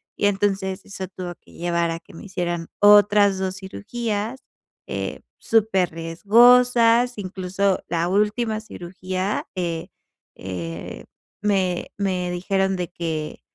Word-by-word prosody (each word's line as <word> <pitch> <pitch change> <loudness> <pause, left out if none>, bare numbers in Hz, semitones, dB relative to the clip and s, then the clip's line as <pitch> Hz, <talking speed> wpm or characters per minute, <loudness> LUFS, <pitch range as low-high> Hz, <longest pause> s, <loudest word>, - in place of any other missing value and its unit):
y 205 - +2
entonces 195 -1 -1
eso 190 -2 -6
tuvo 180 -2 -7
que - - -20
llevar 170 -1 0
a 165 - -4
que 200 - -19
me 165 - -10
hicieran 175 -3 -3
otras 205 -1 +6
2 190 0 -2
cirugías, 215 +4 -4 0.4
eh, - - -4 0.2
súper 200 -6 +2
riesgosas, 235 +7 +4
incluso 190 0 -1
la 170 0 0
última 215 +2 +1
cirugía, 185 0 -4
eh, 170 -3 -3 0.5
eh, 85 -3 -6 0.4
me 190 -4 0
me 185 -3 -1
dijeron 190 +2 0
de 180 -2 -3
que, 160 -3 -4
190 Hz, 120 wpm, -23 LUFS, 175-205 Hz, 0.5 s, otras